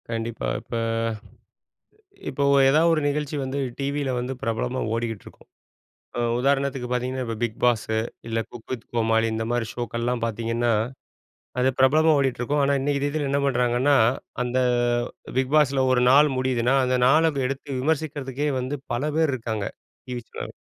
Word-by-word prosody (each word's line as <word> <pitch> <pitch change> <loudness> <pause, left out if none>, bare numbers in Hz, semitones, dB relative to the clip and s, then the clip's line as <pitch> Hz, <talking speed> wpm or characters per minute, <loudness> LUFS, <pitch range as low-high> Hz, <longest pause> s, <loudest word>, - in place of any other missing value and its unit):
கண்டிப்பா. 115 0 -3
இப்ப - - -7 1.5
இப்ப 130 - -6
ஒ - - +5
ஏதாவது 160 +4 +4
ஒரு 160 - +2
நிகழ்ச்சி 150 +1 -1
வந்து 135 +1 -3 0.2
டிவில 140 0 -1
வந்து 125 +2 -3
பிரபலமா 120 +3 -1
ஓடிக்கிட்டிருக்கும். 115 -2 -5 0.7
அ - - +1 0.2
உதாரணத்துக்கு 135 -1 0
பார்த்தீங்கன்னா, 125 +1 -1
இப்ப 115 -1 -3
'பிக் 115 -2 -2
பாஸு', 110 -2 +2 0.3
இல்ல 115 0 -1
'குக் 120 -2 -12
வித் 120 -3 -5
கோமாளி' 115 -1 +2
இந்த 110 0 -2
மாரி 120 -2 0
ஷோக்கள்லாம் 120 0 -2
பார்த்தீங்கன்னா, 115 +1 0 0.9
அது 130 +1 +3
பிரபலமா 155 +5 +5
ஓடிட்ருக்கும். 135 +1 0
ஆனா 140 +1 +2
இன்னக்கு 140 0 0
தேதில 145 0 -1
என்ன 140 +1 +1
பண்ணுறாங்கன்னா, 125 +1 +2 0.5
அந்த 125 +1 -2 0.8
பிக் 130 +2 0
பாஸில 140 -3 +3
1 125 -1 +3
நாள் 145 +3 +6
முடியுதுன்னா, 130 0 +1
அந்த 125 0 +1
நாள 160 +4 +4 0.2
எடுத்து 140 +2 -6
விமர்சிக்கிறதுக்கே 145 -2 -1
வந்து 130 +3 -3 0.2
பல 140 +6 -1
பேர் 160 -3 +3
இருக்காங்க 110 -4 -3 0.4
டிவி 125 -1 -4
சே - - -6
130 Hz, 145 wpm, -24 LUFS, 120-140 Hz, 1.5 s, நாள்